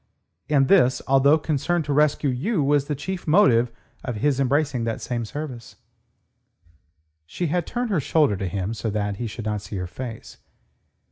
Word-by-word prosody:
And 140 Hz, -3 st, +3 dB
this, 130 Hz, -9 st, +4 dB
although 135 Hz, +3 st, +5 dB
concern 160 Hz, +2 st, -1 dB
to 145 Hz, -1 st, -2 dB
rescue 150 Hz, -1 st, +2 dB
you 150 Hz, -, 0 dB
was 145 Hz, 0 st, +2 dB
the 150 Hz, -, -1 dB
chief 185 Hz, +6 st, -5 dB
motive 125 Hz, -, +4 dB, 0.3 s
of 125 Hz, -, -4 dB
his 135 Hz, +5 st, 0 dB
embracing 140 Hz, -2 st, +1 dB
that 115 Hz, -, -2 dB
same 120 Hz, -2 st, -3 dB
service." 130 Hz, -2 st, -7 dB, 1.5 s
She 175 Hz, -, -3 dB
had 170 Hz, +1 st, -1 dB
turned 245 Hz, -2 st, -2 dB
her 185 Hz, -, +2 dB
shoulder 145 Hz, -6 st, +2 dB
to 95 Hz, 0 st, -3 dB
him 95 Hz, +3 st, -3 dB
so 110 Hz, 0 st, -3 dB
that 105 Hz, -1 st, -2 dB
he 120 Hz, -, -3 dB
should 110 Hz, +1 st, -7 dB
not 105 Hz, -1 st, -2 dB
see 105 Hz, -, -8 dB
her 90 Hz, -1 st, -3 dB
face. 115 Hz, +5 st, -8 dB
135 Hz, 175 wpm, -23 LUFS, 115-150 Hz, 1.5 s, although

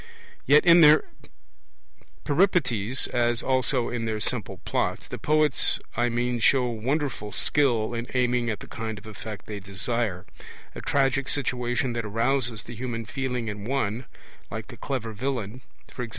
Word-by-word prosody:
Yet 150 Hz, +2 st, +6 dB
in 170 Hz, 0 st, +8 dB
their 150 Hz, 0 st, +7 dB, 1.2 s
Peripeties, 140 Hz, -, +2 dB
as 120 Hz, -1 st, +1 dB
also 130 Hz, -1 st, +2 dB
in 120 Hz, -2 st, -3 dB
their 110 Hz, -1 st, -2 dB
simple -, -, -1 dB
plots, -, -, -1 dB
the -, -, -7 dB
poets 155 Hz, -2 st, +2 dB, 0.2 s
I 120 Hz, +1 st, +2 dB
mean 120 Hz, +1 st, -1 dB
show 125 Hz, +2 st, +4 dB
wonderful 120 Hz, -1 st, -2 dB
skill 120 Hz, -6 st, +1 dB
in 120 Hz, +1 st, -4 dB
aiming 125 Hz, -1 st, +1 dB
at 110 Hz, -, -3 dB
the -, -, -9 dB
kind 110 Hz, -1 st, -5 dB
of 105 Hz, -, -12 dB
effect 110 Hz, -1 st, -8 dB
they 105 Hz, -1 st, -6 dB
desire 100 Hz, 0 st, -2 dB, 0.5 s
a -, -, -7 dB
tragic 135 Hz, -1 st, +1 dB
situation 125 Hz, -2 st, 0 dB
that 115 Hz, -1 st, -2 dB
arouses 115 Hz, +1 st, 0 dB
the 120 Hz, -, -9 dB
human 115 Hz, -1 st, -4 dB
feeling 125 Hz, -1 st, -3 dB
in 105 Hz, -1 st, -5 dB
one, 120 Hz, -1 st, -2 dB, 0.4 s
like 110 Hz, +3 st, -6 dB
the 120 Hz, -, -10 dB
clever 115 Hz, -5 st, -4 dB
villain 120 Hz, 0 st, -3 dB, 0.4 s
(e.g. 120 Hz, -2 st, -3 dB
120 Hz, 150 wpm, -26 LUFS, 110-135 Hz, 1.2 s, in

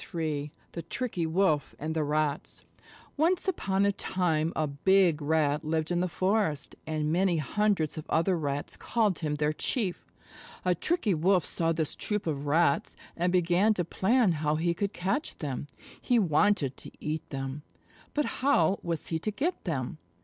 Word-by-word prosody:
III 150 Hz, -3 st, -2 dB, 0.2 s
THE 170 Hz, -, -5 dB
TRICKY 175 Hz, -1 st, -3 dB
WOLF 160 Hz, -5 st, +1 dB
AND 155 Hz, +2 st, -3 dB
THE 160 Hz, -, +1 dB
RATS 150 Hz, -1 st, -1 dB, 0.5 s
Once 340 Hz, +6 st, +2 dB
upon 195 Hz, -, +1 dB
a 200 Hz, -, +4 dB
time 165 Hz, -5 st, 0 dB
a 155 Hz, -, +1 dB
Big 165 Hz, +3 st, +3 dB
Rat 150 Hz, -1 st, +1 dB
lived 160 Hz, +1 st, -1 dB
in 175 Hz, -, +1 dB
the 180 Hz, -, +1 dB
forest, 185 Hz, -4 st, 0 dB
and 155 Hz, 0 st, -1 dB
many 180 Hz, -1 st, +2 dB
hundreds 160 Hz, -, 0 dB
of 155 Hz, -, -10 dB
other 170 Hz, +3 st, +2 dB
Rats 145 Hz, -3 st, -3 dB
called 215 Hz, -7 st, 0 dB
him 150 Hz, -3 st, -1 dB
their 150 Hz, +1 st, 0 dB
Chief. 190 Hz, -, -1 dB, 0.5 s
A 180 Hz, -, +4 dB
Tricky 230 Hz, -, 0 dB
Wolf 180 Hz, +2 st, +3 dB
saw 165 Hz, -1 st, 0 dB
this 160 Hz, -2 st, -1 dB
troop 210 Hz, -1 st, -2 dB
of 145 Hz, -3 st, -2 dB
Rats, 145 Hz, -1 st, +2 dB, 0.2 s
and 175 Hz, +1 st, +1 dB
began 180 Hz, +4 st, +3 dB
to 175 Hz, -, -1 dB
plan 220 Hz, +4 st, +2 dB
how 150 Hz, -1 st, 0 dB
he 170 Hz, +2 st, +1 dB
could 200 Hz, +3 st, -2 dB
catch 195 Hz, -, -2 dB
them. 145 Hz, -2 st, -4 dB, 0.3 s
He 245 Hz, -, +2 dB
wanted 180 Hz, -, +2 dB
to -, -, -9 dB
eat 155 Hz, +1 st, -4 dB
them, 135 Hz, +1 st, -4 dB, 0.5 s
but 295 Hz, -1 st, +2 dB, 0.2 s
how 200 Hz, -, +3 dB
was 170 Hz, -3 st, -3 dB
he 160 Hz, -, -1 dB
to 215 Hz, -, -2 dB
get 300 Hz, -, -2 dB
them? 155 Hz, -3 st, -3 dB
165 Hz, 170 wpm, -29 LUFS, 150-195 Hz, 0.5 s, a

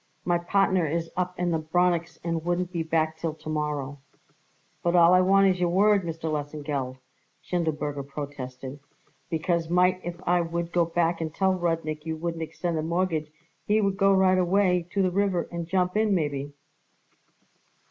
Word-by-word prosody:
My 175 Hz, -1 st, +2 dB
partner 185 Hz, -1 st, +2 dB
is 165 Hz, +2 st, -2 dB
up 180 Hz, 0 st, -2 dB
in 175 Hz, -1 st, 0 dB
the 160 Hz, -, +1 dB
Bronix 170 Hz, +1 st, 0 dB
and 165 Hz, -1 st, -2 dB
wouldn't 175 Hz, +1 st, -1 dB
be 170 Hz, -2 st, -2 dB
back 160 Hz, -1 st, 0 dB
till 160 Hz, -1 st, -3 dB
to 155 Hz, -, -9 dB
morrow." 150 Hz, -2 st, -2 dB, 0.8 s
"But 175 Hz, 0 st, +1 dB
all 170 Hz, 0 st, +7 dB
I 185 Hz, -, +6 dB
want 195 Hz, +1 st, +5 dB
is 185 Hz, -1 st, 0 dB
your 175 Hz, -1 st, +2 dB
word, 200 Hz, +2 st, +4 dB
Mr. 165 Hz, -1 st, -6 dB
Lesengeld," 145 Hz, -4 st, -3 dB, 0.5 s
Schindelberger 155 Hz, -4 st, -2 dB
protested, 140 Hz, -2 st, -7 dB, 0.5 s
"because 165 Hz, 0 st, -1 dB
might 180 Hz, +1 st, +3 dB
if 175 Hz, 0 st, -4 dB
I 175 Hz, 0 st, +4 dB
would 170 Hz, 0 st, -3 dB
go 175 Hz, -1 st, +3 dB
back 170 Hz, 0 st, 0 dB
and 160 Hz, -1 st, -2 dB
tell 190 Hz, +4 st, +1 dB
Rudnik 165 Hz, -4 st, -2 dB
you 160 Hz, 0 st, -4 dB
wouldn't 165 Hz, 0 st, -3 dB
extend 165 Hz, +1 st, -3 dB
the -, -, 0 dB
mortgage 165 Hz, -2 st, -1 dB, 0.4 s
he 210 Hz, +1 st, +3 dB
would 195 Hz, -2 st, 0 dB
go 195 Hz, +1 st, +4 dB
right 190 Hz, -1 st, +4 dB
away 180 Hz, -1 st, +2 dB
to 195 Hz, -1 st, +1 dB
the 185 Hz, -, +1 dB
river 195 Hz, -2 st, 0 dB
and 170 Hz, -1 st, -4 dB
jump 180 Hz, +1 st, 0 dB
in 215 Hz, -2 st, +3 dB
maybe." 145 Hz, -4 st, -2 dB
170 Hz, 175 wpm, -26 LUFS, 155-180 Hz, 0.8 s, all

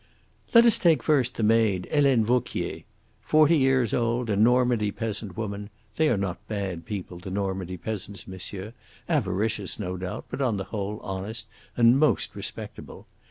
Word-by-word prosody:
"Let 230 Hz, 0 st, +9 dB
us 230 Hz, -, +5 dB
take 165 Hz, -3 st, +3 dB
first 130 Hz, -5 st, +2 dB
the 115 Hz, -, -2 dB
maid, 105 Hz, -4 st, +2 dB
Helene 135 Hz, -6 st, +4 dB
Vauquier. 125 Hz, +1 st, -1 dB, 0.4 s
Forty 155 Hz, +1 st, +4 dB
years 130 Hz, -5 st, +2 dB
old, 120 Hz, -1 st, 0 dB
a -, -, +2 dB
Normandy 120 Hz, 0 st, +3 dB
peasant 105 Hz, -3 st, -4 dB
woman 105 Hz, -2 st, -4 dB, 0.3 s
they 155 Hz, -1 st, +3 dB
are 120 Hz, -, +2 dB
not 95 Hz, -2 st, -2 dB
bad 95 Hz, -6 st, -4 dB
people, 95 Hz, -4 st, -6 dB
the 95 Hz, +2 st, -8 dB
Normandy 95 Hz, -2 st, -3 dB
peasants, 100 Hz, +1 st, -5 dB
monsieur 95 Hz, +3 st, -7 dB, 0.3 s
avaricious, 105 Hz, 0 st, 0 dB
no 90 Hz, -3 st, -4 dB
doubt, 90 Hz, 0 st, -5 dB
but -, -, -5 dB
on 120 Hz, -6 st, +1 dB
the 95 Hz, -, -3 dB
whole 105 Hz, 0 st, -3 dB
honest 95 Hz, +4 st, -5 dB, 0.3 s
and 120 Hz, +2 st, +5 dB
most 155 Hz, 0 st, +2 dB
respectable. -, -, -7 dB
110 Hz, 160 wpm, -26 LUFS, 95-125 Hz, 0.4 s, Let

